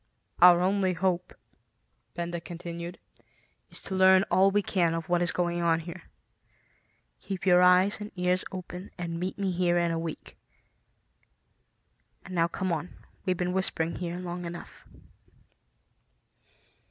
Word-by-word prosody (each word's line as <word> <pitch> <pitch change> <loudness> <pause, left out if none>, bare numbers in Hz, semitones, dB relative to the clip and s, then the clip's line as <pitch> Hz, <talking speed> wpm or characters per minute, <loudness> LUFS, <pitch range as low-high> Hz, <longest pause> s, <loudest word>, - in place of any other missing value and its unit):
"Our 175 0 +8
only 190 0 +1
hope," 180 0 -1 0.8
Benda 170 0 -4
continued, 170 +1 -7 0.7
"is - - -10
to 195 - -6
learn 190 0 +6
all 190 +1 +5
we 205 +1 +1
can 170 -4 +1
of 165 -1 -4
what 175 0 +1
is 175 - +1
going 175 -1 -1
on 165 -1 +2
here. 170 +2 -9 1.1
Keep 195 -2 -6
your 180 -1 +6
eyes 180 +3 +5
and 210 - -6
ears 180 0 +1
open 185 0 -7
and 170 -2 -4
meet 185 +2 -3
me 195 -2 -1
here 175 -1 +1
in 170 -1 +1
a 165 - -1
week. 165 -1 -7 1.9
And 185 - -9
now 170 -1 +2
come 185 +2 -3
on; 165 +1 -2 0.4
we've 185 -2 0
been 180 0 -1
whispering 170 -3 -1
here 175 -1 -4
long 175 -1 -5
enough." 170 0 -9
180 Hz, 140 wpm, -28 LUFS, 170-185 Hz, 1.9 s, Our